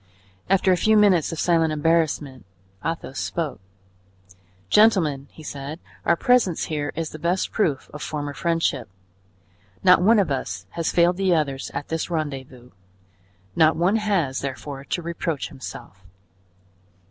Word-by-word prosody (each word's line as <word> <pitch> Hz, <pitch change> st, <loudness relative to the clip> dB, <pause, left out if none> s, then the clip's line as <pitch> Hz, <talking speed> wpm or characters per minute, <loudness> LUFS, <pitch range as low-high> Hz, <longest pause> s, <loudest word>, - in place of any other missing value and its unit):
After 190 Hz, 0 st, +3 dB
a 180 Hz, -, +4 dB
few 215 Hz, +4 st, +3 dB
minutes 190 Hz, -7 st, +4 dB
of 165 Hz, -, -5 dB
silent 165 Hz, -2 st, +2 dB
embarrassment, 155 Hz, -4 st, 0 dB, 0.4 s
Athos 165 Hz, -5 st, -4 dB
spoke. 165 Hz, -4 st, -3 dB, 1.1 s
"Gentlemen," 165 Hz, -, +3 dB
he 155 Hz, -, -14 dB
said, 145 Hz, +2 st, -6 dB, 0.3 s
"our -, -, +4 dB
presence 220 Hz, -4 st, +2 dB
here 145 Hz, -2 st, -2 dB
is 165 Hz, -1 st, -3 dB
the 155 Hz, -, -9 dB
best 175 Hz, +4 st, 0 dB
proof 150 Hz, -11 st, 0 dB
of 150 Hz, -, -8 dB
former 145 Hz, -2 st, -4 dB
friendship; 165 Hz, -, -1 dB, 0.9 s
not 180 Hz, -1 st, +6 dB
one 220 Hz, +5 st, +5 dB
of 195 Hz, -7 st, +2 dB
us 100 Hz, -8 st, -3 dB
has 165 Hz, -1 st, -2 dB
failed 175 Hz, +1 st, +3 dB
the 190 Hz, -2 st, +2 dB
others 140 Hz, -4 st, -1 dB
at 140 Hz, +1 st, -4 dB
this 160 Hz, +1 st, -2 dB
rendezvous; 135 Hz, -6 st, -5 dB, 0.8 s
not 160 Hz, 0 st, +5 dB
one 180 Hz, +6 st, +2 dB
has, 190 Hz, -11 st, 0 dB
therefore, 140 Hz, 0 st, -6 dB
to 175 Hz, -, -3 dB
reproach 165 Hz, -, -3 dB
himself." 95 Hz, +7 st, -10 dB
160 Hz, 140 wpm, -23 LUFS, 140-175 Hz, 1.1 s, not